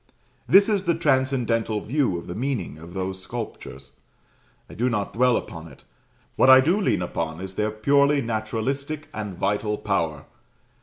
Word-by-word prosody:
This 200 +1 +7
is 205 -3 0
the 170 -1 +2
transcendental 130 -7 +1
view 125 - 0
of 85 - -8
the 90 - -6
meaning 115 - -3
of 85 +3 -12
those 95 0 -4
sculptures. 95 - -8 0.8
I - - -13
do 125 +3 0
not 105 -4 -2
dwell 125 +1 +3
upon 80 -1 -7
it. 70 - -16 0.5
What - - +5
I 130 0 +10
do 170 +10 +2
lean 90 - +1
upon 80 -2 -4
is 95 0 -7
their 105 +2 -1
purely 140 +6 +3
naturalistic 130 +6 -3
and 105 -4 -5
vital 105 +2 -1
power. 85 -8 -2
110 Hz, 160 wpm, -24 LUFS, 95-135 Hz, 0.8 s, I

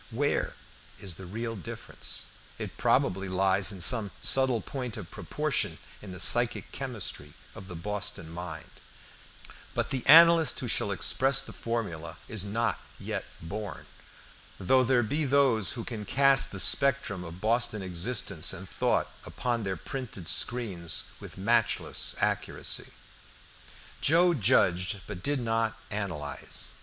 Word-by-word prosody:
Where 145 +5 -1 0.4
is 95 -3 -2
the 95 +2 -8
real 115 +4 -4
difference? 90 -7 -5 0.3
It - - -6
probably 95 +1 +1
lies 95 +2 +4
in 95 -3 -5
some 110 +1 +5
subtle 130 -3 +4
point 125 -5 -5
of 95 -6 -8
proportion - - -1 0.2
in 100 - -9
the 90 - -8
psychic 120 -1 +3
chemistry 110 - -5 0.2
of 95 - -11
the 90 - -8
Boston 105 -1 -3
mind, 85 -1 -7 1.0
but - - -1
the 130 -3 -2
analyst 165 +1 +7
who 125 - -4
shall 105 - +1
express 135 +8 +2
the - - -8
formula 85 -9 -4
is 110 -4 -2
not 115 +3 -1 0.2
yet - - -4 0.2
born; 105 +5 -6 0.7
though 130 +7 +4
there 125 -1 +3
be 145 +9 -1
those 135 -7 +2
who 120 - -5
can 110 -3 -5
cast 135 +3 +4
the 95 - -5
spectrum 110 -3 +1
of 85 +1 -9
Boston 110 -1 +1
existence 95 -1 0
and 95 0 -7
thought - - 0 0.2
upon 120 -2 -2
their 95 -3 -3
printed 105 - -6
screens 95 -10 0 0.2
with - - -11
matchless 115 +3 +1
accuracy. - - -2 1.1
Joe 175 +3 +4
judged 95 - +2
but 90 - -7
did 145 +6 0
not 115 -1 -1
analyze. 90 -9 -4
105 Hz, 135 wpm, -28 LUFS, 95-125 Hz, 1.1 s, analyst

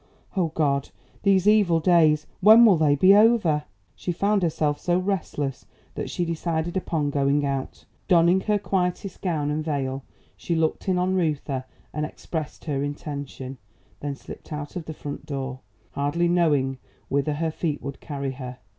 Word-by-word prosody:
O 180 -3 +2
God! 145 -3 0 0.3
these 195 -1 +3
evil 205 -6 +5
days! 160 -3 +4
When 220 +4 +8
will 205 -5 +7
they 155 -3 +3
be 185 +7 +6
over!" 205 -9 +4 0.3
She 180 - -3
found 200 +4 +1
herself 155 -3 0
so 175 0 +1
restless 175 -8 -2 0.3
that - - -4
she 175 - -1
decided 165 0 -2
upon 160 -5 -1
going 140 +1 +2
out. 135 -1 -4 0.2
Donning 175 +1 +4
her 210 +1 +1
quietest 190 -1 -2
gown 155 -6 -1
and 155 +1 -1
veil, 135 -3 -2 0.3
she 170 - -2
looked 160 +3 0
in 185 - +2
on 180 +1 +1
Reuther 150 -7 -1 0.3
and 150 - -2
expressed 155 0 -5
her 140 -4 -1
intention; 140 -3 -6 0.4
then 145 -1 -4
slipped - - -12
out 150 -1 -5
of 175 -3 -5
the 160 - -6
front 145 0 -7
door, 135 -3 -4 0.3
hardly 145 +5 0
knowing 145 -7 +2 0.3
whither 140 +2 0
her 160 +2 -1
feet 155 -2 -2
would 140 0 -6
carry 140 -3 -4
her. 125 -1 -7
155 Hz, 165 wpm, -25 LUFS, 145-180 Hz, 0.4 s, When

